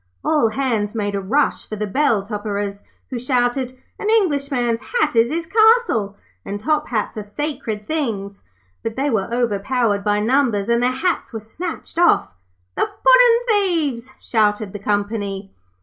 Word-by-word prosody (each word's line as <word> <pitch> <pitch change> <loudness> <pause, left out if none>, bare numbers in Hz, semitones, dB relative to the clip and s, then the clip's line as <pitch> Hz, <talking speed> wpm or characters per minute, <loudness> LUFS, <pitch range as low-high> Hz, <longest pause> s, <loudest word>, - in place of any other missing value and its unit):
All 295 -8 +3
hands 230 -4 -1
made 205 -2 -2
a 200 - -2
rush 275 +10 0
for 215 - -4
the 210 0 -2
bell 225 -1 +1
topperers, 205 -1 -4 0.3
who 250 - -3
shouted, 250 0 0 0.3
'An 420 - -2
Englishman's 280 - +1
hat 465 - 0
is 230 +1 +4
his 330 +1 -2
castle,' 435 - +3 0.3
and 205 +1 -5
Top 300 +6 0
hats 215 -2 -2
are - - -3
sacred 215 -2 -4
things'; 210 -10 -3 0.4
but 225 -1 -4
they 275 +2 0
were 215 -1 -1
overpowered 230 -2 0
by 205 0 +1
numbers, 230 -3 +1
and 235 0 +3
their 250 - +3
hats 340 +7 -1
were 225 - -3
snatched 320 - -6
off. 345 -1 +4 0.4
'THE - - 0
PUDDIN' - - +5 0.4
THIEVES!' 255 +1 -9
shouted 210 -3 0
the 205 - -6
company. 205 -1 -2
235 Hz, 155 wpm, -20 LUFS, 205-285 Hz, 0.4 s, PUDDIN